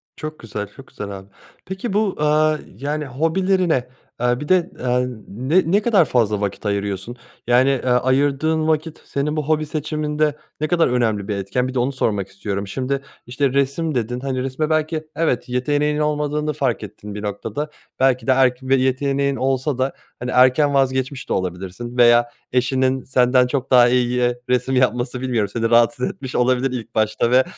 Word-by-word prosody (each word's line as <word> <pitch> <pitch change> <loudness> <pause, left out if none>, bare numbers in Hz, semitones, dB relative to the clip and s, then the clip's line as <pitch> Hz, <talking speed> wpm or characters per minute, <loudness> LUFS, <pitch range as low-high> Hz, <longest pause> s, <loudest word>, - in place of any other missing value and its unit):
Çok 155 0 -7
güzel, 105 -2 -5
çok 135 - -13
güzel 105 - -7
abi, 95 - -16 0.4
peki 190 +3 -4
bu, 205 -2 +1
eee, 155 +1 +3 0.2
yani, 150 +4 -3
hobilerine, 165 +1 +1 0.3
eee, 125 0 +1
bir 150 - -6
de, 185 -2 +3
eee, 125 0 +1 0.2
ne 150 - +1
ne 205 +2 +4
kadar 210 -6 +4
fazla 110 -6 +1
vakit 100 +1 -3
ayırıyorsun? 100 +2 -2 0.3
Yani, 125 +2 +4
eee, 130 -2 0
ayırdığın 140 +5 +2
vakit 155 0 -1
senin 145 +2 -2
bu 155 - 0
hobi 155 0 +1
seçiminde 150 0 -1 0.3
ne 155 - +1
kadar 170 +1 +3
önemli 110 -5 0
bir 105 - -1
etken? 100 +6 -1
Bir 130 - -5
de 130 - 0
onu 125 +3 +1
sormak 105 -7 -1
istiyorum. 100 +1 -4
Şimdi, 135 +5 -2 0.3
işte, 130 +2 0
resim 140 +3 0
dedin, 120 +1 -1
hani, 130 -1 -2
resme 135 +4 -2
belki 155 0 -1
evet 145 -7 0
yeteneğinin 145 +4 0
olmadığını 150 0 0
fark 135 -6 -1
ettin 105 0 -9
bir 105 - -6
noktada. 110 +8 -4 0.3
Belki 130 -1 +2
de - - +5
erk 130 -1 +3
bir 130 +1 +2
yeteneğin 140 +1 +1
olsa 130 +1 0
da, 130 +1 0 0.3
hani, 125 +1 -4
erken 130 +3 +4
vazgeçmiş 130 0 0
de - - +1
olabilirsin 95 +7 -4
veya 120 0 +5 0.2
eşinin 130 +1 +1
senden 125 0 +3
çok 130 0 -3
daha 125 -1 +7
iyi 125 0 +1
resim 125 +1 +1
yapması 125 0 +1
bilmiyorum 120 -6 0
seni 115 -1 0
rahatsız 120 +3 +3
etmiş 130 -2 -8
olabilir 130 +1 +2
ilk 125 -3 -6
başta 110 +2 +1
ve 130 +1 +6
130 Hz, 175 wpm, -21 LUFS, 120-150 Hz, 0.4 s, daha